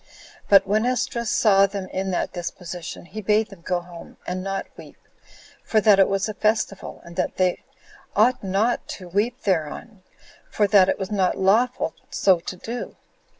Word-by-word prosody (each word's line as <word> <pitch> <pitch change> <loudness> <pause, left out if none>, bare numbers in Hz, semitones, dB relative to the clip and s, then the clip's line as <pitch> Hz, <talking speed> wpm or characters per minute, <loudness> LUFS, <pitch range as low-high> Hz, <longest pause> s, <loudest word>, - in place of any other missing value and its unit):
But 195 -1 +7
when 210 +3 +1
Esdras 245 -2 -1
saw 200 -2 +4
them 195 -1 -5
in 190 +1 -3
that 180 - -2
disposition, 175 -1 -6
he 215 +5 -7
bade 215 +2 +2
them 190 -3 -13
go 175 +1 -1
home, 175 -1 -12
and 185 +1 -3
not 195 0 -3
weep, - - -13 0.7
for 220 - +2
that 210 -2 +5
it 195 - +6
was 195 +1 0
a 215 - -4
festival, 210 -2 -1
and 170 0 -11
that - - -1
they 185 -1 +1 0.5
ought 230 +4 +3
not 200 +5 0
to 185 - -11
weep 210 +8 -1
thereon, 190 +4 -2 0.5
for 210 - +1
that 195 -2 +5
it - - +1
was 190 +1 -5
not 190 -3 +1
lawful 235 +7 +2 0.2
so 190 -3 +3
to 175 - -6
do. 230 +7 -6
195 Hz, 175 wpm, -23 LUFS, 185-215 Hz, 0.7 s, But